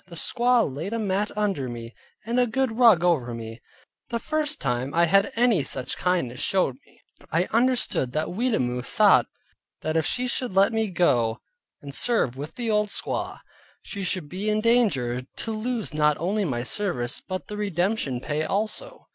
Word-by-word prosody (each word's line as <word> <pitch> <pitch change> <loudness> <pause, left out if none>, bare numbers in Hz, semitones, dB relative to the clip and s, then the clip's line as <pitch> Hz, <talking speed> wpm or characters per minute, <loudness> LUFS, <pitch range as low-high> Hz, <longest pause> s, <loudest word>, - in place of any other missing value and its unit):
The 175 - -11
squaw 240 +7 +2
laid 160 +9 -4
a - - 0
mat 205 -1 0
under 195 -12 0
me, 115 0 -7 0.3
and 235 +2 0
a 245 - +3
good 245 0 -1
rug 220 -8 +6
over 135 -10 +1
me; 115 0 -8 0.5
the 235 - -1
first 305 +4 -1
time 130 +2 -2
I 170 0 +5
had 195 +4 +3
any 230 - +3
such 130 -1 -2
kindness 170 -10 -1
showed 180 -9 +1
me. - - -25 0.3
I 165 +2 +3
understood 240 - +2
that 155 +1 -1
Weetamoo 175 - 0
thought - - +4 0.5
that 155 0 -2
if 160 -2 +2
she 250 0 0
should 245 -4 -2
let 195 +3 +4
me 220 -1 0
go 120 -11 +2 0.5
and 140 -1 -8
serve 220 - +1
with 145 +3 -7
the 240 -2 -3
old 210 0 +2
squaw, - - -3 0.4
she 200 - -6
would 175 -5 -7
be 190 +7 -3
in 215 0 +2
danger 200 - +2
to 140 - -6
lose 220 -1 -3
not 150 -1 +2
only 200 +5 0
my 120 -7 -2
service, 130 -5 -2
but 185 -1 -5
the 210 - -6
redemption 190 - -1
pay 150 +4 -2
also. 220 - -3
185 Hz, 180 wpm, -25 LUFS, 140-225 Hz, 0.5 s, rug